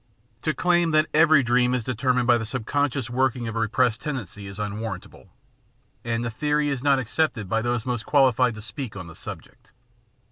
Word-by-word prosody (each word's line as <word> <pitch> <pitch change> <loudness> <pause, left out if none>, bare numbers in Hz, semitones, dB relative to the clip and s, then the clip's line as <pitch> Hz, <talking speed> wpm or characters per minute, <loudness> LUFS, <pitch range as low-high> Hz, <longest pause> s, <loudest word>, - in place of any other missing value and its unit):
To 155 - -1
claim 175 -1 +2
that 155 - +4
every 155 -3 +5
dream 125 +1 +2
is 125 - -2
determined 125 +1 0
by 120 -1 +4
the 115 - -4
sub 115 0 -4
conscious 140 -3 0
working 125 -1 0
of 115 - -5
a - - -1
repressed 115 +1 +1
tendency 115 - -5
is 100 0 -9
unwarrantable, 105 -1 -6 0.7
and 115 0 -2
the 115 - -2
theory 150 +4 0
is 135 -3 -2
not 140 0 +3
accepted 125 -3 -1
by 110 +4 0
those 120 -1 -1
most 120 -3 -3
qualified 130 -4 +3
to 105 - -9
speak 120 0 -6
on 95 -3 -7
the 85 - -11
subject. 125 - -11
125 Hz, 190 wpm, -24 LUFS, 115-140 Hz, 0.7 s, every